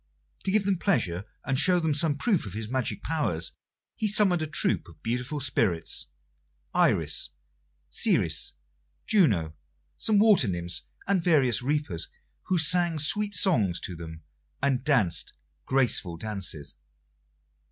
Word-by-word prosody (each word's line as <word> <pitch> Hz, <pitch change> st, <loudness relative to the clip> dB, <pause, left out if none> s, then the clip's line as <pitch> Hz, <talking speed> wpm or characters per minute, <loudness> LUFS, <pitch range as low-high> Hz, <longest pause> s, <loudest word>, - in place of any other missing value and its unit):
To 190 Hz, -, +1 dB
give 205 Hz, 0 st, +1 dB
them 195 Hz, -3 st, 0 dB
pleasure 95 Hz, -, 0 dB, 0.2 s
and 135 Hz, -1 st, 0 dB
show 180 Hz, -1 st, +4 dB
them 160 Hz, -3 st, 0 dB
some 150 Hz, -1 st, 0 dB
proof 195 Hz, -, 0 dB
of 95 Hz, -, -7 dB
his 110 Hz, +1 st, -5 dB
magic 130 Hz, +1 st, -3 dB
powers, 115 Hz, -, -1 dB, 0.4 s
he 215 Hz, -, -1 dB
summoned 195 Hz, -4 st, +4 dB
a 155 Hz, -, -2 dB
troop 115 Hz, -, 0 dB
of 80 Hz, -3 st, -18 dB
beautiful 125 Hz, +6 st, -3 dB
spirits 105 Hz, -, -1 dB, 0.7 s
Iris, -, -, +2 dB, 0.6 s
Ceres, -, -, +2 dB, 0.5 s
Juno, 100 Hz, -, +2 dB, 0.4 s
some 215 Hz, -2 st, +2 dB
water 205 Hz, -, +5 dB
nymphs, 85 Hz, -1 st, -3 dB, 0.2 s
and 190 Hz, -3 st, 0 dB
various 140 Hz, -10 st, +3 dB
reapers, 140 Hz, -, -2 dB, 0.4 s
who 185 Hz, -, +1 dB
sang 170 Hz, +1 st, +3 dB
sweet 205 Hz, +7 st, +1 dB
songs 105 Hz, -, +4 dB
to 90 Hz, -, -5 dB
them 80 Hz, -1 st, -10 dB, 0.4 s
and 135 Hz, -2 st, 0 dB
danced 115 Hz, -, +1 dB, 0.3 s
graceful 120 Hz, -10 st, +1 dB
dances. 95 Hz, -7 st, -2 dB
135 Hz, 130 wpm, -26 LUFS, -, 0.7 s, water